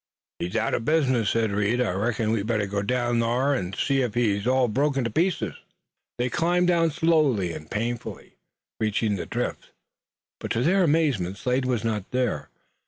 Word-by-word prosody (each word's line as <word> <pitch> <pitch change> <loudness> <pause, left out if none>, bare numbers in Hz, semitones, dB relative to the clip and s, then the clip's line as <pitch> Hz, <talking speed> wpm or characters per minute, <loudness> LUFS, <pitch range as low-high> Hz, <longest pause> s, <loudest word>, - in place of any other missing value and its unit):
"He's 90 - -4
out - - 0
o' - - +1
business," 130 -4 +1
said 115 -2 +1
Reed. 105 +4 +1
"I 125 -6 +1
reckon 110 +3 -1
we'd 110 -2 -1
better 110 -3 +1
go 100 +1 -2
down 120 +2 0
thar, 125 +5 +1
an' 95 -8 -3
see 135 +4 +1
ef 120 -3 -2
he's 105 -3 +1
all 130 0 +3
broke 140 +6 +1
to 125 -4 0
pieces." 140 - 0 0.6
They 120 +1 0
climbed 175 +5 +1
down 165 -2 +3
slowly 150 - +2
and 75 - -9
painfully, 115 +3 -4 0.4
reaching 110 -1 0
the 95 - -5
drift, - - -3 0.7
but - - -5
to 115 - 0
their 190 +6 +3
amazement 145 - +1
Slade 125 +3 0
was 125 -4 0
not 105 -4 -2
there. 125 -2 -1
120 Hz, 175 wpm, -25 LUFS, 105-135 Hz, 0.7 s, all